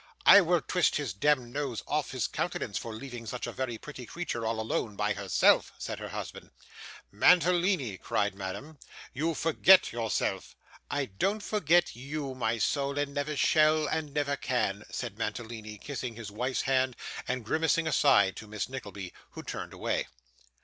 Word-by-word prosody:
'I 200 - +10
will 175 -2 +2
twist 180 +2 +1
his 140 -9 -2
demd 130 +4 +2
nose 130 -4 -3
off 150 -1 -1
his 130 -2 -1
countenance 100 - -2
for 115 - -6
leaving 120 0 -8
such 125 +3 -4
a - - -4
very 125 -3 -3
pretty 130 -2 -9
creature 120 -6 -3
all 115 0 -1
alone 110 -1 -2
by 105 +1 0
herself,' 100 -1 +3
said - - -5
her - - -6
husband. - - -7 0.6
'Mantalini,' 175 - +3
cried 105 -1 0
Madame, 100 +11 -7 0.3
'you 160 +4 -1
forget 175 +4 +5
yourself.' 115 -2 -2 0.3
'I 145 -1 0
don't 205 +2 +1
forget 175 - +2
you, 140 +2 -5
my 115 -2 -1
soul, 140 +4 0
and 145 -1 -1
never 145 +1 -2
shall, 155 +1 +4
and 155 -1 -2
never 145 0 0
can,' 120 -7 -1
said - - -5
Mantalini, 110 -2 -5
kissing 125 -1 -5
his 110 -3 -8
wife's 125 +5 -1
hand, 130 -1 +1 0.3
and 125 -2 -2
grimacing 160 +5 +1
aside, 130 -11 +4
to 110 - -8
Miss 105 -2 -3
Nickleby, 100 -8 -7 0.2
who - - -8
turned - - -6
away. - - -2
130 Hz, 165 wpm, -29 LUFS, 110-150 Hz, 0.6 s, I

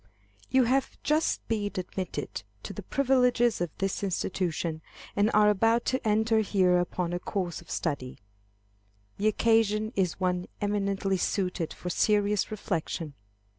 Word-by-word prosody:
_ - - -36 0.5
You 260 -1 +4
have 260 +3 +1
just 310 +2 +1
been 210 -3 0
admitted 185 0 -4 0.2
to - - -6
the - - -6
privileges 250 -5 +2
of 175 - 0
this 195 -1 -1
institution, 175 -4 -2 0.3
and 205 +1 +3
are 210 0 +6
about 225 +4 +2
to 260 -3 -1
enter 220 +1 +3
here 185 -4 +3
upon 175 0 -2
a 175 - -1
course 180 -2 -3
of 170 - -18
study. 140 -6 -3 1.0
The 210 - +1
occasion 215 0 +2
is 185 -3 0
one 180 -1 0
eminently 200 -1 0
suited 180 -3 -1
for 180 - -5
serious 205 +1 +2
reflection. 170 -7 -3
200 Hz, 140 wpm, -28 LUFS, 180-220 Hz, 1.0 s, are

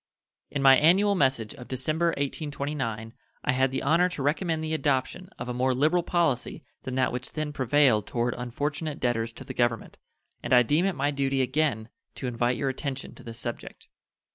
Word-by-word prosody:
In 140 - -2
my 135 -1 +8
annual 190 +8 +4
message 130 - +1
of 125 - -11
December, 155 +6 0
1829, 140 -6 -3 0.3
I - - +2
had 130 +1 +2
the 130 +1 -3
honor 170 +5 +3
to 150 -6 -5
recommend 160 +2 0
the 160 0 -2
adoption 155 +4 -1
of - - -6
a 125 - -3
more 130 +1 +1
liberal 155 +7 +3
policy 170 -8 0 0.2
than 130 - -5
that 130 0 +2
which 125 0 -5
then 155 -1 -3
prevailed 130 -5 +3
toward 120 0 -1
unfortunate 145 +5 -3
debtors 115 -2 0
to - - -9
the 130 - -7
Government, 120 -3 -1 0.4
and - - -1
I 125 0 +7
deem 150 +9 +2
it 195 - -1
my 140 +1 0
duty 135 -1 0
again 130 -5 0 0.3
to - - -6
invite 120 0 0
your 135 - 0
attention 135 0 -5
to - - -15
this 115 -1 -7
subject. 120 0 -7
135 Hz, 190 wpm, -27 LUFS, 125-155 Hz, 0.4 s, my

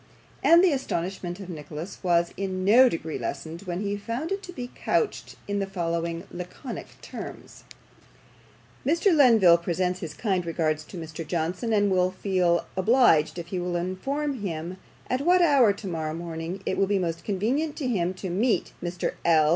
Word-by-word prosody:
and 335 +2 +7
the 370 - +5
astonishment 185 - -3
of 195 - -8
Nicholas 160 +1 -7
was 170 -2 +2
in 185 -1 -3
no 245 +6 +7
degree 160 -4 -4
lessened, 165 +1 -5
when 175 +1 -2
he 205 0 -1
found 235 - -4
it 390 0 -1
to 360 - -9
be 250 -7 -7
couched 440 - -1
in 205 0 -1
the 195 - -1
following 170 -2 -2
laconic 180 +8 -8
terms: - - -9 1.2
"Mr. 335 +7 +3
Lenville 220 - +6
presents 180 +1 -1
his 155 -4 -6
kind 190 -3 0
regards 160 -2 -1
to 180 - -10
Mr. 160 0 -7
Johnson, 175 +7 -2
and 205 -2 +3
will 185 -1 +3
feel 185 -2 +1
obliged 190 - +4
if 170 -1 -6
he 185 - -2
will 175 0 -2
inform 265 +11 -2
him 170 -1 -4 0.3
at 255 +1 0
what 355 +5 +4
hour 275 -9 +5
tomorrow 165 -6 -4
morning 170 +2 -5
it - - -1
will 195 - +3
be 200 0 +2
most 165 -3 -2
convenient 250 +10 -1
to 275 - -3
him 185 -7 +1
to 185 -1 -5
meet 210 +1 +1
Mr. 175 0 -2
L. 155 -2 +4
185 Hz, 170 wpm, -26 LUFS, 170-230 Hz, 1.2 s, and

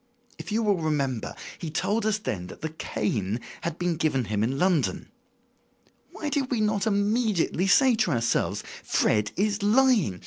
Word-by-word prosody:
If - - -7
you 225 +2 +1
will 205 -3 +2
remember, 140 -7 -1 0.2
he 165 - -5
told 200 +7 0
us 215 -1 +2
then 95 - -4
that - - -11
the 160 0 -3
cane 105 -7 -2 0.2
had 170 -1 -3
been 175 -2 -1
given 150 -5 +1
him 105 0 -1
in 130 +4 -1
London. 175 -4 +1 1.0
Why 300 - -4
did 275 -3 -1
we 245 - 0
not 215 0 +1
immediately 205 -3 +1
say 260 +5 +5
to 220 - +2
ourselves: 120 -3 0 0.2
'Fred 105 -1 +1
is 205 +2 0
lying. 215 - +3
180 Hz, 165 wpm, -26 LUFS, 135-215 Hz, 1.0 s, say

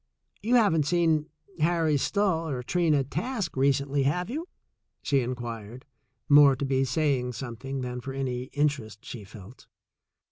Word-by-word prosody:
You 240 +3 +2
haven't 165 -11 +3
seen 160 -3 +2 0.3
Harry 165 -1 +2
Stull 165 +1 0
or 125 -2 -3
Trina 155 0 +2
Task 210 - -3
recently, 140 +1 +1
have 180 - 0
you 320 +6 -4 0.3
?" - - -54
she 140 - +2
inquired, 120 -2 -5 0.4
more 145 -2 +7
to 140 - -3
be 135 0 +1
saying 130 -2 0
something 130 +3 -5
than 125 0 -4
for 135 +2 -6
any 130 -2 -3
interest 130 -7 -2
she 115 -4 -7
felt. 105 +3 -13
140 Hz, 145 wpm, -27 LUFS, 125-160 Hz, 0.4 s, more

